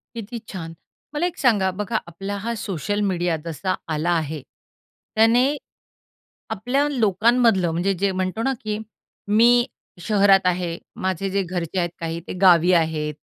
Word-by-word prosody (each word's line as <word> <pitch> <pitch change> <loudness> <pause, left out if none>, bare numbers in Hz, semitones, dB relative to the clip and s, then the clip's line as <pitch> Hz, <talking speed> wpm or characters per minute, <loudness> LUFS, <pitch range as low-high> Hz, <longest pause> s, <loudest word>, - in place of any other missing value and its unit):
किती 230 +1 -6
छान! 165 -4 -7 0.4
मला 300 +4 0
एक 355 -1 -3
सांगा, 210 -8 +3
बघा 210 +4 -2
आपला 195 +4 -5
हा 235 +1 -1
सोशल 205 -1 -3
मीडिया 175 -2 0
जसा 170 +3 -2 0.2
आला 155 +3 -1
आहे. 155 -1 -4 0.7
त्याने 240 +6 +4 0.9
आपल्या 245 +7 0
लोकांमधलं 225 - +3
म्हणजे 175 +4 0
जे 200 - +2
म्हणतो 185 +4 -2
ना 270 +2 +1
की, 215 -1 -2 0.5
मी 240 +3 +5 0.4
शहरात 195 -1 +4
आहे 175 -2 0 0.3
माझे 190 +1 -1
जे 200 +1 0
घरचे 180 0 -3
आहेत 175 -1 0
काही, 165 0 -3
ते - - -4
गावी 180 -1 +6
आहेत. 160 -3 +1
195 Hz, 145 wpm, -22 LUFS, 175-225 Hz, 0.9 s, गावी